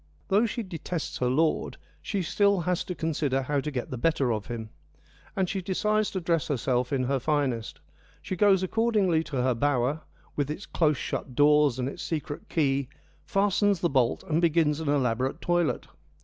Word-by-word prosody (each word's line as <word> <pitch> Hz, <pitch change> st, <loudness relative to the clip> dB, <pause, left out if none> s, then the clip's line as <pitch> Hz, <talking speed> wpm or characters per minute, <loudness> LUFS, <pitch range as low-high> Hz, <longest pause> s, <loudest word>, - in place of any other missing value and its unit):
Though 210 Hz, +4 st, +4 dB
she 235 Hz, +2 st, -3 dB
detests 175 Hz, -3 st, -5 dB
her 125 Hz, -, +1 dB
lord, 155 Hz, +5 st, +1 dB, 0.2 s
she 200 Hz, -3 st, -2 dB
still 200 Hz, +2 st, +2 dB
has 180 Hz, +1 st, 0 dB
to 180 Hz, -, -4 dB
con 160 Hz, -1 st, -2 dB
sider 135 Hz, -3 st, 0 dB
how 145 Hz, +2 st, 0 dB
to 150 Hz, -, -3 dB
get 130 Hz, -4 st, -4 dB
the 125 Hz, -, -4 dB
better 140 Hz, -5 st, +2 dB
of 105 Hz, -1 st, -4 dB
him, 115 Hz, -2 st, -6 dB, 0.6 s
and 190 Hz, -1 st, +1 dB
she 190 Hz, +1 st, -2 dB
decides 210 Hz, +3 st, 0 dB
to 190 Hz, -, -3 dB
dress 170 Hz, -3 st, 0 dB
herself 125 Hz, -3 st, 0 dB
in 135 Hz, -2 st, +1 dB
her 135 Hz, +1 st, 0 dB
finest. 130 Hz, -5 st, -1 dB, 0.4 s
She 185 Hz, -, -5 dB
goes 190 Hz, 0 st, +4 dB
accordingly 200 Hz, -5 st, +2 dB
to 140 Hz, -3 st, -4 dB
her 130 Hz, 0 st, +2 dB
bower, 140 Hz, +3 st, 0 dB, 0.3 s
with 145 Hz, -1 st, -1 dB
its 155 Hz, +6 st, -5 dB
close 155 Hz, -4 st, +1 dB
shut 125 Hz, -, -4 dB
doors 145 Hz, -2 st, +4 dB
and 125 Hz, 0 st, -1 dB
its 140 Hz, -, -6 dB
secret 150 Hz, -2 st, -4 dB
key, 140 Hz, -4 st, +1 dB, 0.4 s
fastens 200 Hz, -1 st, +2 dB
the 170 Hz, -, +1 dB
bolt, 130 Hz, -4 st, +1 dB
and 160 Hz, +1 st, 0 dB
begins 160 Hz, -3 st, +2 dB
an 160 Hz, -3 st, -2 dB
elaborate 130 Hz, 0 st, 0 dB
toilet. 175 Hz, -2 st, 0 dB
150 Hz, 185 wpm, -27 LUFS, 135-180 Hz, 0.6 s, Though